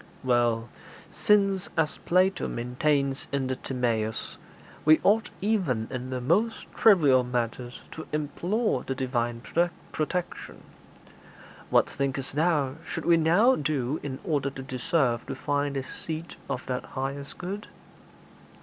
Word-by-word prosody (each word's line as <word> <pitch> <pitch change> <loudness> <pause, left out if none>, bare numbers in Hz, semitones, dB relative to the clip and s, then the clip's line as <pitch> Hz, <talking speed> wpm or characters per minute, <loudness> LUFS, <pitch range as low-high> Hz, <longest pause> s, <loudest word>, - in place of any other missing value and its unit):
'Well, 120 -2 +2 0.4
since, 195 -3 +2
as 160 -2 +1
Plato 185 +2 +2
maintains 135 +3 0
in 140 -1 0
the 130 0 -1
"Timæus," 115 -4 -2 0.5
we 155 +1 +6
ought 220 +3 +3
even 180 - +1
in 130 -1 -4
the 130 -1 -2
most 195 - +1
trivial 145 - +6
matters 120 0 -3
to 160 - -8
implore 175 +9 0
the 135 - -3
Divine 120 -2 -1 0.5
protection, 175 +3 -3 1.1
what - - +4
thinkest 135 -1 -2
thou 150 -3 +1
should - - -4
we 170 - +6
now 175 +11 +5
do 145 -2 -1
in 135 -2 -4
order 145 -7 0
to 135 -1 -8
deserve 130 -1 0
to - - -4
find 145 -1 -1
the 135 - -1
seat 160 +5 -6
of - - -3
that 125 -1 -2
highest 140 +1 -5
good?' 195 +4 -5
140 Hz, 130 wpm, -27 LUFS, 125-170 Hz, 1.1 s, we